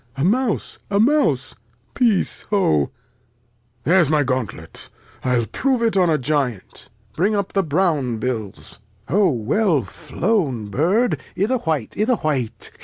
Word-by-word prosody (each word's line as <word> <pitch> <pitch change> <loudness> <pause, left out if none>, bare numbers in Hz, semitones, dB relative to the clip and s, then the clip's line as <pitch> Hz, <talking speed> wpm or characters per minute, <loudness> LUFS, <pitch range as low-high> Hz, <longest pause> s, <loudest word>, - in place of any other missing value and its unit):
A 135 - -1
Mouse, 225 +5 0
a 200 0 +1
Mouse, 220 - +2 0.4
peace, 230 -6 +2
hoa! 80 - +2 1.0
There's 170 +1 +4
my 155 -1 +3
Gauntlet; 120 - -4 0.3
I'll 125 -3 +1
prove 260 - 0
it 225 -3 +1
on 180 -3 +3
a 155 - +3
Giant: 130 -7 -2 0.3
Bring 200 +6 +1
up 200 -1 -2
the 195 - +3
brown 155 -7 0
Bills: 110 -4 -5 0.3
O 195 -2 +3
weU 145 - +1
flown 150 - -2
Bird; 185 - +1 0.2
i' 195 - +2
th' 240 -5 -2
White, 150 -8 -1
i' 215 - +3
th' 245 -1 +1
White. 125 -8 -2
155 Hz, 140 wpm, -21 LUFS, 125-205 Hz, 1.0 s, There's